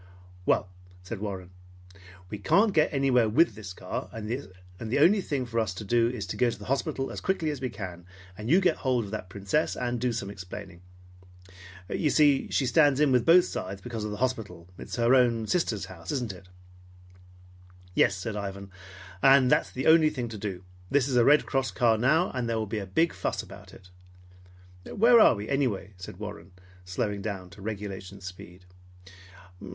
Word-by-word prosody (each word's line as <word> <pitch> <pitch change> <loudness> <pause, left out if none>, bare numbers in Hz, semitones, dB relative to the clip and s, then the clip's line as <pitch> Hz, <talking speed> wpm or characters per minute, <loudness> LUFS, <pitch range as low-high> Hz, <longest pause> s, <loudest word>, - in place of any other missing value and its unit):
"Well," - - +2 0.4
said 95 +3 -6
Warren, 95 -3 -6 0.8
"we 105 - -5
can't 200 - +3
get 155 -3 +3
anywhere 130 -5 +2
with 165 +10 +3
the 105 -4 -9
car, - - -5
and 110 -1 -7
the 105 -2 -5
only 180 +8 +5
thing 140 -7 -2
for 115 -1 -2
us 105 -5 -1
to 100 - -6
do 115 +2 +2
is 120 -5 -5
to 90 - -6
go 125 - +3
to 115 - -5
the 105 - -11
hospital 135 0 -2
as - - -6
quickly 165 -5 0
as 145 -3 -6
we 130 - -2
can, 90 -5 -8 0.3
and 105 +3 -6
you 180 +5 +5
get 175 -4 +2
hold 125 -4 0
of 100 - -10
that 105 -4 -5
Princess, 100 +10 -1
and 120 -1 -3
do 125 -1 +1
some 105 -4 -4
explaining. 95 -1 -9 1.1
You 150 - 0
see 145 -2 +3
she 135 - +1
stands 145 0 +4
in 150 -2 +4
with 125 +1 +2
both 175 +2 +7
sides 95 +1 -5
because 115 +1 -6
of 105 - -3
the 105 - -5
hospital. 110 -9 -3
It's - - -6
her 120 +1 +3
own 120 -3 +3
sister's 110 - -1
house, 85 -1 -8
isn't 120 -7 -2
it?" 95 0 -15 1.5
"Yes," 95 - +3
said 100 +4 -5
Ivan, 100 -1 -6 0.5
"and 135 -1 +6
that's - - +3
the 130 - -5
only 160 -1 +6
thing 125 -6 -4
to 110 - -7
do. 95 -3 -5 0.3
This 140 -2 +2
is 130 - -1
a 120 - +5
Red 145 +4 +5
Cross 135 -2 -1
car 115 -2 +3
now, 155 +9 +3
and 125 -2 -3
there 115 - 0
will 110 - -1
be 105 +1 -3
a 100 - -6
big 165 - +1
fuss - - -3
about - - -13
it." 90 -1 -16 1.0
"Where 235 +3 +6
are 215 - +6
we, 105 +1 -6
anyway?" 120 -8 -1
said 90 0 -10
Warren, 100 -3 -8 0.3
slowing 100 +3 -2
down 95 -4 -5
to 100 - -14
regulation 100 -2 -6
speed. 90 -1 -11
115 Hz, 195 wpm, -27 LUFS, 100-135 Hz, 1.5 s, both